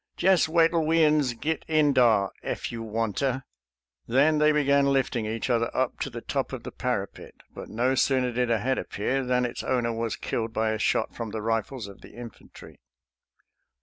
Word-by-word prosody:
" - - -51
Jess 185 -3 +3
wait'll 165 0 +3
we 165 +1 +3
uns 150 -5 +2
git 160 +7 -2
in 155 -3 +3
dah, 110 -6 +4
eff - - -4
you 115 -1 -6
wanter." 115 +4 -2 0.6
Then 145 +6 +3
they 150 0 +5
began 140 -2 +3
lifting 125 -4 0
each 110 +1 -3
other 115 -2 +1
up 130 -1 0
to - - -2
the 120 -2 -7
top 135 +1 -3
of 125 -3 -6
the 125 - -7
parapet, 115 -6 -4 0.2
but - - -9
no 125 +4 +1
sooner 130 -1 +2
did 125 0 0
a 115 - +3
head 130 +4 -1
appear 130 +6 -2
than 125 0 +1
its 120 - -5
owner 120 -2 0
was 115 -1 -2
killed 115 -1 -3
by 110 -1 0
a 110 - -2
shot - - 0
from 115 -2 -5
the 110 +1 -5
rifles 115 +2 -2
of 100 - -13
the - - -14
infantry. 120 -2 -12
125 Hz, 195 wpm, -26 LUFS, 115-140 Hz, 0.6 s, they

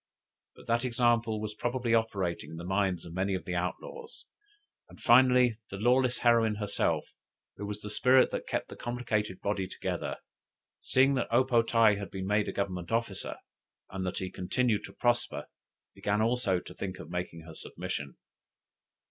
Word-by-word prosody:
But - - -15
that 115 +1 +1
example 120 -3 +2
was 105 0 -4
probably 120 +2 -1
operating 100 -6 0
in 80 - -8
the 85 - -6
minds 95 -1 0
of 85 - -9
many 95 +2 0
of 90 -3 -5
the 90 - -3
outlaws, 460 - -5 0.6
and - - -15
finally 125 -2 +5
the 95 - -6
lawless 125 +3 +3
heroine 115 -2 +4
herself, 105 -1 0 0.5
who 100 - -5
was 105 0 -5
the 105 - -6
spirit 130 +4 +5
that - - -4
kept - - -2
the - - -8
complicate 110 -5 -2
body 100 -2 -1
together, - - -4 0.6
seeing 135 +2 +3
that 130 - 0
O 120 +3 +5
po 125 -3 +3
tae 115 -3 +4
had 100 -1 -6
been 95 -1 -5
made 105 +1 +1
a - - -1
government 95 -2 -3
officer, 115 -4 -2 0.5
and 95 -1 -3
that 90 0 -3
he 95 -1 -3
continued 105 +4 0
to - - -12
prosper, 120 -11 0 0.5
began 105 +1 -1
also 110 -5 +2
to - - -11
think 95 -1 -5
of 80 - -10
making 90 -2 -4
her 80 0 -11
submission. 70 -2 -6
105 Hz, 175 wpm, -30 LUFS, 95-120 Hz, 0.6 s, finally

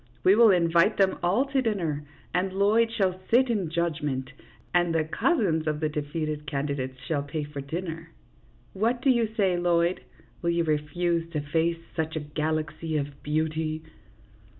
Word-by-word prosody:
" - - -32
We 190 - +6
will 225 +1 +7
invite 170 +2 +4
them 195 -1 +2
all 195 +10 +2
to 275 -1 0
dinner, 170 - -1 0.3
and 185 +2 +1
Lloyd 215 +4 +3
shall 190 -5 0
sit 250 +1 +4
in 195 -7 -1
judgment, 150 -6 -2 0.4
and 175 -1 +2
the 160 - +3
cousins 165 - +1
of 150 -1 0
the 155 -1 0
defeated 150 0 -3
candidates 140 -2 -2
shall 145 -1 0
pay 145 +2 -4
for 145 -1 -6
the 135 - -13
dinner. 165 +1 -5 0.6
What 235 +5 0
do 270 - +5
you 235 -3 +2
say, 190 -4 +3
Lloyd? 175 0 +2 0.4
Will 170 - 0
you 170 0 +2
refuse 165 +2 0
to 150 - 0
face 165 +3 0 0.2
such 160 -1 -2
a - - 0
galaxy 155 +1 -2
of 140 -1 -4
beauty 155 +1 -1
165 Hz, 170 wpm, -27 LUFS, 150-190 Hz, 0.6 s, will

